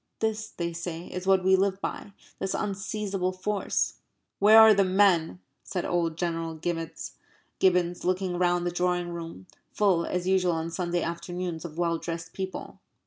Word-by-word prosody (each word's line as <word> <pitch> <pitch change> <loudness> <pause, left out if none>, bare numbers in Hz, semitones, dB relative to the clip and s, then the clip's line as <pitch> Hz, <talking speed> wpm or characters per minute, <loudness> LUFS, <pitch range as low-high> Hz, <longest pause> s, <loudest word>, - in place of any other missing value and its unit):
This, 220 -1 -2
they 170 -1 -4
say, 170 0 -5
is 180 +1 -6
what 190 -1 +4
we 190 +1 +5
live 190 0 +1
by 200 - -5 0.3
this 190 - -2
unseizable 195 -2 -2
force. 195 +2 -1 0.4
"Where 215 +2 +7
are 220 -1 +9
the 200 -1 +4
men?" 185 - +3 0.2
said 180 - -3
old 165 -2 0
General 165 -2 -2
Gibbons, 175 +2 -2
looking 185 -1 -1
round 175 -1 +2
the 175 - 0
drawing 175 0 0
room, 165 - -7 0.3
full 190 -5 +2
as 180 -1 -2
usual 185 -2 +3
on 165 +1 -3
Sunday 175 0 -1
afternoons 170 0 -4
of 160 -1 -8
well 170 -1 0
dressed 165 -1 -6
people. 190 -1 -6
180 Hz, 155 wpm, -27 LUFS, 170-190 Hz, 0.4 s, are